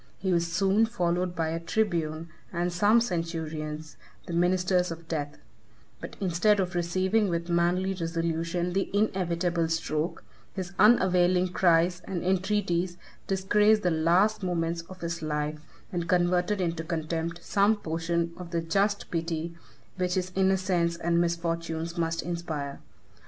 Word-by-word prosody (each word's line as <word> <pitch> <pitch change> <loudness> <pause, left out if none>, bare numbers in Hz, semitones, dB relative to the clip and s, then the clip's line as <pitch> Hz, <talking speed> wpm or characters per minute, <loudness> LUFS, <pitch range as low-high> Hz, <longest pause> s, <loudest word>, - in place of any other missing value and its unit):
He 190 -1 0
was 170 -1 +1
soon 195 +5 +3
followed 180 -4 -1
by 165 -1 0
a 165 +1 -2
tribune 165 -4 -1 0.2
and 175 0 -1
some 210 +6 +4
centurions, 160 -5 -4 0.3
the 175 - -6
ministers 180 +1 +2
of 165 0 -8
death; 150 -3 -3 0.6
but - - -8
instead 195 +2 +2
of 185 -1 -1
receiving 185 +4 +1
with 170 0 -2
manly 175 +3 +2
resolution 165 0 -2
the 195 +1 0
inevitable 175 -4 +1
stroke, 165 0 -2 0.3
his 190 -1 -5
unavailing 185 -4 +4
cries 175 0 +3
and 185 -3 -3
entreaties 185 -2 0 0.3
disgraced 210 +3 +3
the 180 - +2
last 175 +7 +3
moments 170 -2 -1
of 185 -1 -11
his 170 0 -3
life, 150 0 -2 0.3
and 175 -1 -2
converted 180 +3 +2
into 170 -2 -1
contempt 165 +1 -3
some 200 +2 +3
portion 170 -2 -2
of 180 -1 -8
the 170 -1 -1
just 200 +5 0
pity 165 0 -2 0.4
which 180 0 0
his 185 0 -1
innocence 185 -3 +1
and 170 0 +1
misfortunes 170 -1 -2
must 165 -1 -1
inspire. 160 -5 -4
175 Hz, 135 wpm, -28 LUFS, 165-185 Hz, 0.6 s, some